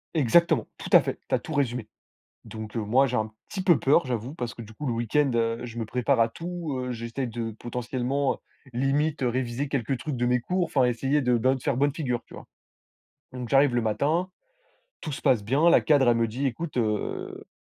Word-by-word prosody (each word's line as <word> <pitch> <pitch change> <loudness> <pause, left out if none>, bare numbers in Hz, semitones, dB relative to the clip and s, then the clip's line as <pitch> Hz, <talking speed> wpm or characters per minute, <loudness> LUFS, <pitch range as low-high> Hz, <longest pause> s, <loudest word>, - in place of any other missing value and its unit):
Exactement, 160 +4 +3
tout - - -7
à - - +9
fait, - - -4
tu - - -5
as - - +3
tout 160 - -7
résumé, 125 -6 -1 0.6
donc 110 +1 -8
heu, - - +1
moi 130 +6 +3
j'ai 125 - -1
un 110 -1 -1 0.2
petit 190 - -4
peu 175 -3 +5
peur, 145 +3 +3
j'avoue, 120 +1 -3
parce 120 -6 -5
que 120 - -8
coup 110 +7 -8
le 120 - 0
week-end, 120 +5 +1
heu, 115 0 +1
je 120 0 -9
me 115 - -2
prépare 125 +3 +1
à 115 - +4
tout. 170 -1 -5
Heu, 125 0 -3
j'essaye 115 +3 -4
de 115 0 -4
potentiellement, 125 +3 -1
heu, - - -11 0.4
limite, 135 +4 0
réviser, 125 +2 -1
quelques 135 -2 -1
trucs 150 -3 -4
de 120 0 0
mes 125 0 +3
cours, 180 +8 0
enfin, 130 -3 +2
essayer 135 +5 +1
de, 125 -2 +2
bien 130 +3 +2
de - - -9
faire 130 - 0
bonne 145 +1 +2
figure 125 -6 -2
tu - - -15
vois? - - -10 0.9
Donc 125 -2 -6
j'arrive 135 -2 +4
le 120 - +2
matin, 150 - 0 0.7
tout 155 - -5
se - - -6
passe 110 -6 +2
bien, 145 +8 +4
la - - +6
cadre 140 -5 +4
elle 115 - +3
me 115 0 +2
dit: 125 +6 -3
«Écoute, 150 +5 -3
heu, 110 -4 -2
125 Hz, 220 wpm, -26 LUFS, 115-145 Hz, 0.9 s, à